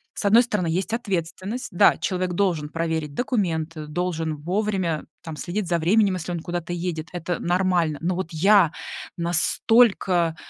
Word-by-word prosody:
с - - -4
одной 225 +4 +6
стороны, 210 -8 -1
есть 185 +7 -1
ответственность: 200 +1 -3
да, 200 +3 +5
человек 185 -1 -2
должен 175 -5 0
проверить 160 -2 -2
документы, 165 - -2
должен 160 -1 -2
вовремя 180 0 -1 0.2
там 160 -2 -7
следить 180 +6 -3
за 170 0 +1
временем, 195 +4 +3
если 175 0 -4
он 170 - -3
куда-то 175 +1 -4
едет- 170 -2 -3
это 175 0 -3
нормально. 175 -4 +1
Но 175 +2 0
вот 185 -2 -3
я 190 0 +5 0.5
настолько 175 0 +2
175 Hz, 150 wpm, -24 LUFS, 165-195 Hz, 0.5 s, одной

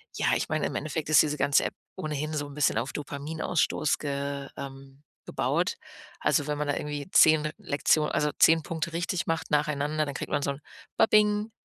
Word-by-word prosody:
ja, - - +1
ich - - -2
meine, - - 0
im - - -6
Endeffekt 155 +1 -3
ist 155 - +7
diese 150 -1 -1
ganze 140 - +3
App - - -4 0.2
ohnehin 155 0 -3
so 145 -1 -2
'n 145 - -11
bisschen 150 -1 +1
auf 135 - -2
Dopaminausstoß 150 +2 -1
ge 140 -1 -3
ähm, 135 +1 -10 0.2
gebaut. - - 0 0.5
Also, 145 - +1
wenn 150 0 -1
man 150 0 -2
da - - +2
irgendwie 145 +2 -5
10 155 -1 +5
Lektio 155 -5 +1
also, 150 - 0
10 160 0 +6
Punkte 165 0 -4
richtig 175 +1 -2
macht 165 0 -2
nacheinander, 150 0 +1
dann 140 - -5
kriegt - - -5
man - - +1
so 140 - 0
'n 140 +1 -8 0.4
"Babing" 210 0 +3
150 Hz, 190 wpm, -27 LUFS, 140-160 Hz, 0.5 s, ist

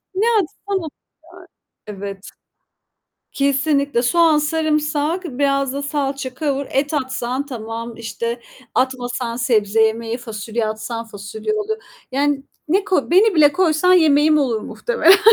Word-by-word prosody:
Ne 415 +4 +1 0.2
atsan 395 +3 -4
oluyor. 320 -4 -6 1.0
Evet. 200 -1 -7 1.1
Kesinlikle 280 -2 +1
soğan, 325 +3 +4
sarımsak, 305 +2 0
biraz 275 -2 0
da 280 +1 -4
salça 275 -3 -3
kavur, 280 -2 -2
et 285 +3 0
atsan 260 -1 -2
tamam, 230 -2 -6
işte 235 +1 -4 0.3
atmasan 245 -2 -1
sebze 225 -3 +2
yemeği, 225 +1 0
fasulye 225 0 -4
atsan 220 +2 -4
fasulye 215 - -5
olur. 430 +1 -2 0.4
Yani 280 0 +1 0.3
ne 385 +4 +2
koy 370 -7 +1
beni 395 +3 +5
bile 295 -2 +6
koysan 360 0 +3
yemeğim 305 -2 +5
olur 240 -6 0
muhtemelen 475 - +1
yani. 390 - +9
275 Hz, 125 wpm, -20 LUFS, 235-310 Hz, 1.1 s, yani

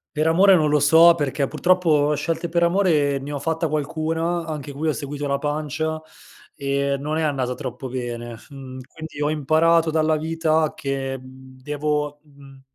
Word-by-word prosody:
Per 155 +1 +1
amore 190 +4 +6
non 155 -3 +2
lo 150 0 +3
so, 160 +4 +7
perché 145 -3 -1
purtroppo 155 -3 +2
scelte 165 +3 -2
per 170 +1 +1
amore 170 -6 +2
ne 140 +2 -6
ho 145 - -3
fatta 160 +2 -1
qualcuna, 160 +3 -2
anche 150 -3 -6
qui 145 +3 -3
ho 155 - +2
seguito 145 +1 -5
la 140 0 0
pancia, 155 +2 -2 0.5
ehm, 140 0 -1
non 155 +2 -2
è - - 0
andata 135 -4 -1
troppo 130 -1 -6
bene, 120 -2 -5 0.2
mhmm, 135 -2 -9
quindi 160 0 -9
ho 145 - +1
imparato 160 +2 +2
dalla 155 0 +2
vita 160 0 0
che, 135 -1 -3
mhmm, 130 0 -15
devo 150 +1 -2
mhmm, 140 -2 -17
150 Hz, 170 wpm, -22 LUFS, 140-160 Hz, 0.5 s, so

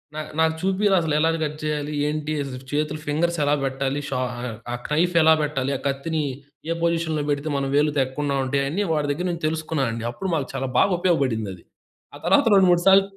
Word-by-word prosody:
నా 155 - -2 0.2
నాకు 160 0 +3
చూపిరా 195 +1 +2
అసలు 160 -2 -1
ఎలా 160 +1 +3
కట్ 150 0 -3
చేయాలి 150 -1 -2
ఏంటి, 150 0 -2
అజ్ 135 -2 -7 0.2
చేతులు, 150 +1 -1
ఫింగర్స్ 170 +4 0
ఎలా 145 0 +2
పెట్టాలి. 135 +1 -1
షా 130 - -1 0.2
ఆహ్, 120 -3 -5 0.2
ఆ - - 0
నైఫ్ 170 +4 +1
ఎలా 160 0 +7
పెట్టాలి. 140 -2 -1
ఆ - - -13
కత్తిని 155 +4 -1 0.5
ఏ - - +2
పొజిషన్‌లో 165 -2 0
పెడితే 145 +1 -1
మనం 135 0 -1
వేలు 150 +1 +3
తెగ్గకుండా 140 +1 0
ఉంటాయి 140 +1 0
అయన్ని 170 +9 -1
వాడి 150 -2 0
దగ్గర 165 +6 -2
నుంచి 170 -1 -6
తెలుసుకున్నానండి. 150 -7 -2
అప్పుడు 190 +11 -5
మాకు 145 -4 -2
చాలా 135 0 -2
బాగా 200 - +4
ఉపయోగపడిందది. 115 - 0 0.5
ఆ - - -8
తర్వాత 195 +10 +4
రెండు, 190 -2 +6
మూడు 175 0 +3
సార్లు 195 0 +7
150 Hz, 195 wpm, -23 LUFS, 140-165 Hz, 0.5 s, ఎలా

